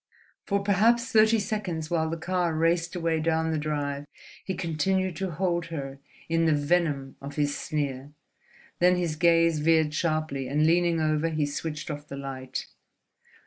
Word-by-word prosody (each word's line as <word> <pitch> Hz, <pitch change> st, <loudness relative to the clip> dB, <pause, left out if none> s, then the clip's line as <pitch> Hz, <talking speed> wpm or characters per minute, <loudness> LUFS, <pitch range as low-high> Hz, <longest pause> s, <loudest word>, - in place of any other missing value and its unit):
For 200 Hz, -1 st, 0 dB
perhaps 230 Hz, +5 st, +3 dB
thirty 220 Hz, +1 st, +5 dB
seconds, 185 Hz, -7 st, -3 dB
while 160 Hz, -2 st, +1 dB
the 165 Hz, -, -3 dB
car 175 Hz, -1 st, -1 dB
raced 165 Hz, +2 st, +1 dB
away 165 Hz, -2 st, 0 dB
down 160 Hz, 0 st, +1 dB
the 155 Hz, -, 0 dB
drive, 145 Hz, -1 st, -3 dB, 0.4 s
he 190 Hz, -, -3 dB
continued 185 Hz, +2 st, 0 dB
to 190 Hz, 0 st, -2 dB
hold 175 Hz, 0 st, -1 dB
her 140 Hz, -4 st, -6 dB, 0.3 s
in 165 Hz, 0 st, +1 dB
the 160 Hz, -, +4 dB
venom 145 Hz, -3 st, 0 dB
of 140 Hz, +1 st, -7 dB
her 150 Hz, -, +2 dB
sneer; 145 Hz, -1 st, -3 dB, 0.7 s
then 180 Hz, +1 st, +5 dB
his 175 Hz, -3 st, -1 dB
gaze 165 Hz, -1 st, +3 dB
veered 160 Hz, -1 st, +3 dB
sharply, 155 Hz, -4 st, -1 dB
and 150 Hz, +4 st, +2 dB
leaning 170 Hz, 0 st, +3 dB
over 155 Hz, +1 st, +1 dB
he 155 Hz, -2 st, 0 dB
switched 150 Hz, +2 st, -4 dB
off 145 Hz, 0 st, -7 dB
the 140 Hz, -, -7 dB
light. 130 Hz, -1 st, -5 dB
160 Hz, 160 wpm, -27 LUFS, 150-175 Hz, 0.7 s, thirty